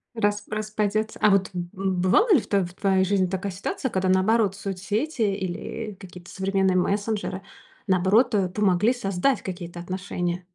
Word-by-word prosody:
Рас 205 -1 0
распадётся. 215 0 -2
А 210 - +6
вот, 195 -1 +3
м, 175 -1 -4
бывали 190 - +3
ли 270 - +4
в - - -13
тво 195 -3 +2
в 175 - -10
твоей 190 0 +2
жизни 190 -1 +2
такая 190 +2 -3
ситуация, 200 +7 -3
когда 190 -3 0
наоборот, 195 +2 +3
соцсети 205 - -3
или, 200 +2 -2
э, - - -17
какие-то 180 -2 -12
современные 190 -1 +1
мессенджеры 200 0 -1 0.5
наоборот, 200 +6 +3
э, 190 -3 +1
помогли 205 +4 +2
создать 205 +2 0
какие-то 175 -2 -7
отношения? 180 -1 -3
195 Hz, 160 wpm, -25 LUFS, 185-210 Hz, 0.5 s, А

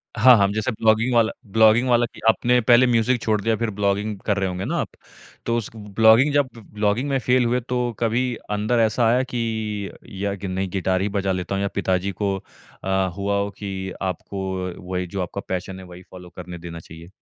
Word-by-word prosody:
हाँ, 125 +3 +7
हाँ। 100 -1 +4
जैसे 110 +4 -1
ब्लॉगिंग 110 +2 +2
वाला 115 -2 +3 0.2
ब्लॉगिंग 110 +4 +5
वाला 120 0 +4
कि - - -13
आपने 125 +2 +3
पहले 120 +2 +6
म्यूज़िक 120 0 +2
छोड़ 110 -1 +1
दिया 115 +2 +1
फ़िर 115 +1 -2
ब्लॉगिंग 100 +1 -1
कर 100 -2 +1
रहे 95 -1 0
होंगे 90 +1 -4
ना - - -2
आप। - - -2 0.6
तो 115 - 0
उस 115 - -3
ब्लॉगिंग 110 +6 +4
जब 145 -2 +2
ब्लॉगिंग 105 +4 -1
में 135 - +1
फेल 125 +1 +2
हुए 120 +2 +1
तो 125 -1 0
कभी 115 +2 +1 0.3
अंदर 105 +3 +1
ऐसा 110 +2 +1
आया 125 +3 +3
कि 110 -4 -2 0.3
या 100 -1 -1
कि 100 0 -6
नहीं 95 +1 -2
गिटार 95 0 0
ही 100 - 0
बजा 100 -1 -1
लेता 90 +1 -2
हूँ। 100 - -1
या 100 - 0
पिताजी 95 0 0
को 100 -1 +1 0.5
अ, 95 - -3 0.3
हुआ 100 0 -1
हो 100 0 -1
की 95 -2 -5
आपको 95 +1 -4 0.4
वही 90 0 -2
जो 95 +2 -4
आपका 90 +2 -4
पैशन 95 +1 -4
है 95 - -10
वही 90 0 -12
फ़ॉलो 90 -1 -11
करने 90 -1 -7
देना 85 0 -8
चाहिए? 80 0 -12
105 Hz, 210 wpm, -22 LUFS, 95-115 Hz, 0.6 s, हाँ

